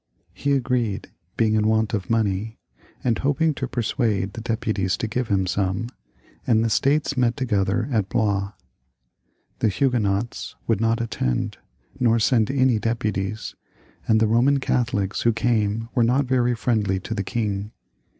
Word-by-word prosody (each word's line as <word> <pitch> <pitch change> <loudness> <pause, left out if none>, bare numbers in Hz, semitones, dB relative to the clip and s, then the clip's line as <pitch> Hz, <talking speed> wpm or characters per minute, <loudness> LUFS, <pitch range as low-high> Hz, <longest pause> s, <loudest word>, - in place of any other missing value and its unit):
He 140 - 0
agreed, 125 -6 -1 0.3
being 110 -2 +2
in 110 0 +2
want 110 0 +1
of 95 -4 -2
money, 110 0 0 0.5
and 115 -3 +1
hoping 150 +3 +1
to 130 -2 -4
persuade 110 -5 -1
the 115 - -6
deputies 110 -5 -1
to - - -2
give 125 +2 -2
him 95 -2 +1
some, 95 +4 -1 0.6
and 115 -2 +3
the 115 - 0
States 145 +3 +2
met 125 -1 +1
together 110 -3 0
at 110 -5 0
Blois. 100 -2 0 1.1
The 110 - +2
Huguenots 110 -2 -1
would 115 -2 +1
not 115 0 +2
be - - 0
present, 60 - -2 0.4
nor 115 -2 +3
send 115 -1 +2
any 130 -4 +2
deputies, 105 -2 -2 0.5
and 110 -1 +4
the 110 - +4
Eoman 125 +6 +3
Catholics 115 -7 0
who 115 - +3
came 115 -1 0
were 120 - +3
not 130 +4 +2
very 125 -1 +2
friendly 105 -5 0
to 115 - -5
the 100 -3 -2
king. 105 -1 -2
115 Hz, 155 wpm, -23 LUFS, 105-120 Hz, 1.1 s, and